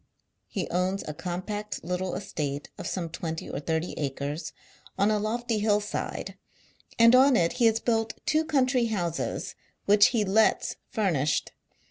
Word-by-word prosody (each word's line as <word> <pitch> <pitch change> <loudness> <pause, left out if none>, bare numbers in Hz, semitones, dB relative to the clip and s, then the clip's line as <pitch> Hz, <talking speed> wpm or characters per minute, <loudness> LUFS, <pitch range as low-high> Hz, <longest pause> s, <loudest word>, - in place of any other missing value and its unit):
He 190 -5 -3
owns 185 +2 0
a 150 - -3
compact 185 +6 -5
little 180 +2 -2
estate 150 -7 -4
of - - -4
some 175 -3 -2
twenty 160 0 -5
or - - -4
thirty 160 +3 -2
acres 145 +2 -3 0.5
on 200 +2 +3
a 210 - +2
lofty 225 +1 -1
hill 210 0 +3
side, 210 0 -5 0.6
and 230 +1 +7
on 260 +1 +6
it 170 -5 +2
he 230 - +7
has 225 0 +2
built 225 -1 0
two 310 +1 +2
country 260 -5 +2
houses 175 -7 -2 0.3
which 205 0 +7
he 225 -4 +1
lets 215 +3 +2
furnished. 165 - 0
200 Hz, 150 wpm, -27 LUFS, 170-225 Hz, 0.6 s, and